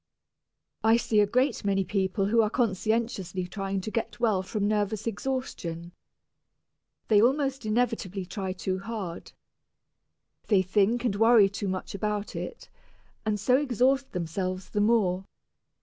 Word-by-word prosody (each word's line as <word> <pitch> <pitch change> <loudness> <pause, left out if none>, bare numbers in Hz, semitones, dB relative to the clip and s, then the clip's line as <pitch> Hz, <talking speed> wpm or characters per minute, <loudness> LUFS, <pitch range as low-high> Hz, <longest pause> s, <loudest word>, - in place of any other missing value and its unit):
I 225 +1 +5
see 220 -2 +1
a 205 - +4
great 255 +4 +1
many 195 -1 +1
people 195 +1 0
who 225 +3 +4
are 215 - +1
conscientiously 215 -4 -1
trying 195 +1 -3
to 215 - -5
get 230 +1 -3
well 215 -6 +2
from 205 +2 -2
nervous 210 0 0
exhaustion. 205 -8 -4 1.2
They 210 -2 +5
almost 270 0 +1
inevitably 215 -4 -1
try 190 0 -4
too 185 0 -3
hard. 195 -4 -6 1.1
They 195 -4 +4
think 210 +6 +1
and 215 -5 +1
worry 225 -1 +6
too 200 +1 -4
much 185 0 -4
about 210 0 -3
it, 475 - -6 0.6
and 210 -1 +1
so 250 +6 +3
exhaust 265 0 +1
themselves 185 +2 -3
the 205 - 0
more. 200 -4 +2
210 Hz, 135 wpm, -27 LUFS, 190-230 Hz, 1.2 s, worry